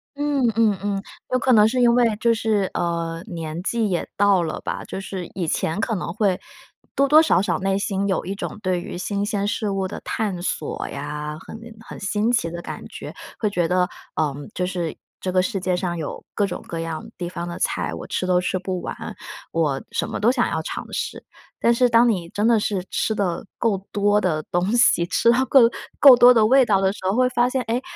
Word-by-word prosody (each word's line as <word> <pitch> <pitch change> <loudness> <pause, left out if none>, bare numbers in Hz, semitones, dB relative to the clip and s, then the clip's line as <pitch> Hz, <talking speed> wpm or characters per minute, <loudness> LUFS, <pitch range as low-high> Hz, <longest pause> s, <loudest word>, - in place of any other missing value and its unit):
嗯 285 -3 +1
嗯 220 -3 +3
嗯， 200 -1 -2 0.3
有 255 - +3
可 255 +1 +3
能 215 -1 +7
是 255 +3 0
因 235 -1 +5
为 235 -3 +3
就 235 0 +3
是， 220 -4 0
呃， 170 -1 -2
年 165 -1 -5
纪 220 +2 0
也 175 - -1
到 200 -2 +4
了 160 -2 -3
吧。 - - -4
就 - - -6
是 190 -2 -6
以 175 -3 -2
前 160 +4 -1
可 225 -1 0
能 175 - -3
会 200 -2 +1 0.6
多 275 0 +3
多 305 +3 +7
少 315 - +3
少 200 - 0
内 195 0 0
心 200 0 -1
有 190 - -1
一 190 - -3
种 200 - -6
对 185 -2 0
于 - - -7
新 200 +2 -2
鲜 205 -2 -1
事 210 0 -1
物 195 -1 -1
的 - - -7
探 200 -5 -2
索 175 - -3
呀， 150 0 -5
很 220 - -10 0.3
很 - - -9
新 210 +3 0
奇 230 -9 +1
的 170 +1 -6
感 - - -7
觉。 - - -9 0.3
会 215 - +1
觉 175 -4 0
得， 180 0 +2 0.3
嗯， 145 -2 -2
就 180 - 0
是 175 -3 -3 0.3
这 185 - -2
个 185 - +3
世 195 +1 -2
界 180 0 0
上 180 -1 -2
有 155 -3 -5
各 205 - +1
种 180 - -6
各 165 - -5
样 165 -1 -4
地 175 -1 -4
方 170 -1 -5
的 170 - -6
菜， - - -1
我 - - -7
吃 - - -2
都 180 -1 +2
吃 185 - -1
不 185 -1 -4
完， - - -5 0.6
我 150 -5 0
什 - - -2
么 - - -4
都 230 +4 +4
想 245 -3 +1
要 160 - -1
尝 - - -6
试， - - -4 0.4
但 235 - +4
是 250 +1 +3
当 230 +1 +5
你 180 -7 -1
真 210 +4 0
的 230 -2 +4
是 200 -3 -1
吃 220 - 0
的 185 -4 -1
够 220 -4 +1
多 205 0 +2
的 160 -5 0
东 175 +3 +1
西， 235 -7 +4
吃 235 - +3
到 250 +2 +3
够 270 - +6 0.4
够 270 -3 +10
多 245 0 +8
的 225 -3 +4
味 265 +4 +6
道 200 -3 +3
的 190 0 +3
时 - - -11
候， 200 - 0
会 255 0 +4
发 245 0 +2
现， 260 0 -1
诶， 235 +2 -1
195 Hz, 245 characters per minute, -22 LUFS, 175-225 Hz, 0.6 s, 够